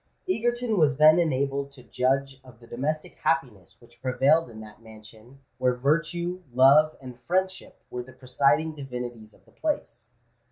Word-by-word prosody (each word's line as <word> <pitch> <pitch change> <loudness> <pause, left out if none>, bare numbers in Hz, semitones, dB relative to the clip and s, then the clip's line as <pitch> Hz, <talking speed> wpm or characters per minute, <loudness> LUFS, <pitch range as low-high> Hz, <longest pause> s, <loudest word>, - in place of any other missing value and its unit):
Egerton 240 - 0
was 145 -4 +3
then 155 +3 +6
enabled 140 -3 -1
to 130 -3 -15
judge 135 +2 -1
of 125 -2 -17
the 120 - -16
domestic 145 +7 -4
happiness 120 -10 -2
which 120 -1 -22
prevailed 135 +4 +2
in 110 -2 -11
that 105 +1 -13
mansion 110 +4 -16 0.2
where 125 -1 +2
virtue, 165 +6 -1
love, 140 +5 +5
and 125 -2 -11
friendship 185 +1 -2
were 125 - -4
the 125 +2 -13
presiding 130 +4 +1
divinities 125 -6 -8
of - - -27
the - - -24
place. 120 - -4
135 Hz, 155 wpm, -26 LUFS, 120-155 Hz, 0.2 s, then